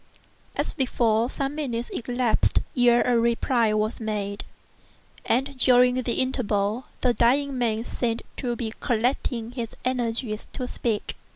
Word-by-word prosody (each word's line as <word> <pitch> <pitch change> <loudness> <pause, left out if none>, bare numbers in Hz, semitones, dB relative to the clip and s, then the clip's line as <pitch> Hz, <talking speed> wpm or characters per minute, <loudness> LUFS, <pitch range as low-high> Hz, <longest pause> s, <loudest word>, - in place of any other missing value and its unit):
As - - -1
before, 235 -4 +1
some 275 +1 -2
minutes 245 -6 -3
elapsed 245 -1 +1
ere 240 -1 +5
a 245 -2 +3
reply 235 0 +2
was 215 +2 0
made; 205 -2 -2 0.8
and 270 +3 +1
during 250 -1 +5
the 240 -1 -1
interval 230 -3 0 0.2
the 250 -2 +3
dying 270 +4 +2
man 230 -3 0
seemed 235 -2 -2
to 240 -2 -2
be 225 -2 -4
collecting 235 0 0
his 235 -3 -5
energies 235 -3 -2
to 255 - -3
speak. 225 -4 -2
240 Hz, 130 wpm, -25 LUFS, 225-255 Hz, 0.8 s, ere